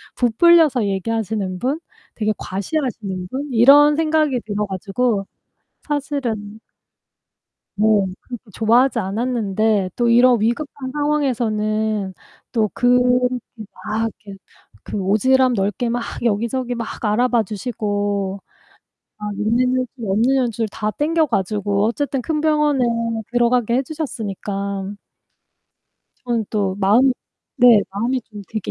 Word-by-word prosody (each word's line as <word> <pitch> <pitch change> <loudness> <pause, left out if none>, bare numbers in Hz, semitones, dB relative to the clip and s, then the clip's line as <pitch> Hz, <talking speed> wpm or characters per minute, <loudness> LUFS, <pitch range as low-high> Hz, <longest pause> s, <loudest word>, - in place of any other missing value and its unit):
부풀려서 275 +1 +4
얘기하시는 200 -1 -2
분, 270 - -1 0.4
되게 215 -1 0
과시하시는 200 - -3
분, 280 +5 -4
이런 285 +6 +7
생각이 310 -4 +1
들어 210 0 -2
가지고 200 +2 -1 0.6
사실은 255 -8 -3 1.2
네 210 - +2 0.3
그렇게 245 -3 -9
좋아하지 235 +5 +3
않았는데 215 -2 0
또 240 -1 +1
이런 240 -1 +5
위급한 260 +3 -2
상황에서는 220 -8 -1 0.4
또 220 -3 +1
그 245 0 +3 0.9
막 225 +1 -1
이렇게 200 -1 -10 0.4
그 - - -6
오지랖 250 +7 +3
넓게 205 +3 -1
막 240 +1 -1 0.2
여기저기 235 +3 -1
막 230 -2 -6
알아봐 235 +2 +2
주시고 205 -2 -3 0.8
막 210 -1 -5
있는 225 +4 +2 0.2
연줄, 255 - -2 0.2
없는 220 +7 +2
연줄 235 -4 0
다 210 +1 -3
당겨 315 +7 +1
가지고 205 -3 0
어쨌든 270 +3 -1
큰 305 +4 -2
병원에 300 -3 +2 0.5
들어가게 240 -1 +2
해 265 - +1
주셨으니까. 200 - -4 1.3
저는 235 -3 -1
또 200 -3 0
마음이 215 +7 +4 0.4
네. 245 -5 +7
마음이 235 +7 -1
좀 210 -2 -11
되게 215 -3 -4
230 Hz, 255 characters per minute, -20 LUFS, 205-255 Hz, 1.3 s, 이런